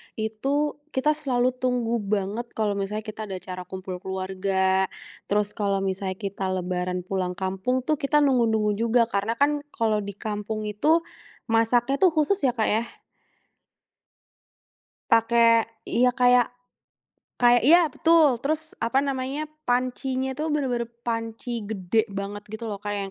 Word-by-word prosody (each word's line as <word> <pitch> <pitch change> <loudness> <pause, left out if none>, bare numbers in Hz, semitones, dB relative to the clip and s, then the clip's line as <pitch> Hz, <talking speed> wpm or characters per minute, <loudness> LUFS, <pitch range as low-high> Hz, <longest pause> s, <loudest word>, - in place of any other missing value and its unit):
itu 275 +8 -1 0.2
kita 280 +3 +3
selalu 255 -5 +1
tunggu 250 -2 -1
banget 205 +3 -2
kalau 205 -2 0
misalnya 210 +2 -3
kita 215 0 -6
ada 190 - -5
acara 185 -1 -7
kumpul 185 -1 -6
keluarga, 190 0 0 0.4
terus 205 0 +1
kalau 200 -2 -1
misalnya 190 0 -2
kita 195 -1 -4
lebaran 180 -1 -2
pulang 185 -1 -2
kampung 195 +7 -1
tuh 305 +2 0
kita 295 +1 +3
nunggu-nunggu 225 -6 +2
juga, 230 +1 +3
karena 225 0 -1
kan 290 +3 +2
kalau 225 -6 0
di 200 -1 -6
kampung 215 +1 -4
itu 300 +11 +2 0.5
masaknya 240 +4 +2
tuh 370 - +6
khusus 310 +6 +2
ya 255 -8 +1
Kak 220 -3 +1
ya. 220 +2 +2 2.3
Pakai, 230 0 +5 0.2
iya 250 +1 +3
kayak 245 -1 +4 0.8
kayak 245 -1 +5
iya 335 -1 +6
betul, 315 -5 +4
terus 310 +4 -2
apa 260 +4 +1
namanya, 275 +2 -2 0.2
pancinya 255 +1 0
tuh 300 +4 -3
bener-bener 260 -6 -1 0.2
panci 230 0 -3
gede 220 +2 0
banget 200 +1 -6
gitu 220 +1 -6
loh 200 - -5
kayak 205 0 -3
230 Hz, 140 wpm, -25 LUFS, 200-255 Hz, 2.3 s, tuh